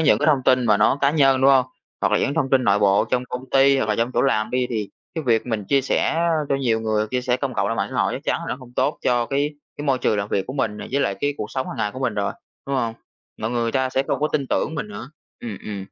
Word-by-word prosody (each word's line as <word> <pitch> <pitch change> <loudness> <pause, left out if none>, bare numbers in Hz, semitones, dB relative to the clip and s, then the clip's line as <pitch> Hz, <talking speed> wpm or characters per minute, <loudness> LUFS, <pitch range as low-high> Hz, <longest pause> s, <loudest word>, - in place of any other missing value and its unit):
những 155 - +4
cái - - 0
thông 145 -4 +3
tin 130 -1 +4
mà 105 -2 +5
nó 110 +6 +3
cá 140 - +4
nhân, 135 -3 +3
đúng 135 +1 +6
hông? 130 -2 +5 0.4
Hoặc - - +1
là - - +4
những - - +1
cái 140 - -2
thông 135 - 0
tin 130 -1 +3
nội 100 -2 +3
bộ 100 -1 +3
trong 125 0 +1
công 125 +1 -7
ty 135 0 +5
hoặc 110 - -1
là 105 - +2
trong 115 +2 0
chỗ - - +2
làm 110 -5 +1
đi 125 0 0
thì 110 -4 -2 0.3
cái 160 -2 -3
việc 115 -1 +2
mình 110 -4 -2
chia 140 +7 +2
sẻ, 135 - 0
a, 170 +1 +1 0.2
cho - - +2
nhiều 115 -5 0
người, 110 -1 0
chia 125 - 0
sẻ 125 0 0
công 130 -1 -3
cộng 100 - 0
ra 115 - -1
mạng - - -1
xã - - -5
hội - - 0
chắc - - -5
chắn - - 0
là - - -7
nó - - -2
không 125 -2 -14
tốt 145 - +1
cho 120 -1 +2
cái 140 +3 0 0.3
cái 145 - -6
môi 135 -3 +2
trường 105 - +1
làm 100 +1 -2
việc 95 - -1
của 130 - -5
mình 115 -6 -1
nè, 105 - -7
với 140 - +1
lại 100 - 0
cái 145 0 0
cuộc 105 - -4
sống 130 -1 -3
hàng - - -6
ngày 110 -2 -1
của - - -7
mình 130 -4 -1
rồi, 100 -1 -1 0.3
đúng 140 0 -1
hông? 115 -3 -1 0.4
Mọi 110 - -2
người 120 -1 0
người 115 - -1
ta 130 -1 +1
sẽ 135 - +1
không - - -1
có 150 - +1
tin 140 -3 -1
tưởng 155 - -1
mình 160 +7 -4
nữa. 205 - -8 0.3
Ừm, 110 -5 -6
ừm. 105 -2 -5
125 Hz, 325 wpm, -22 LUFS, 110-140 Hz, 0.4 s, đúng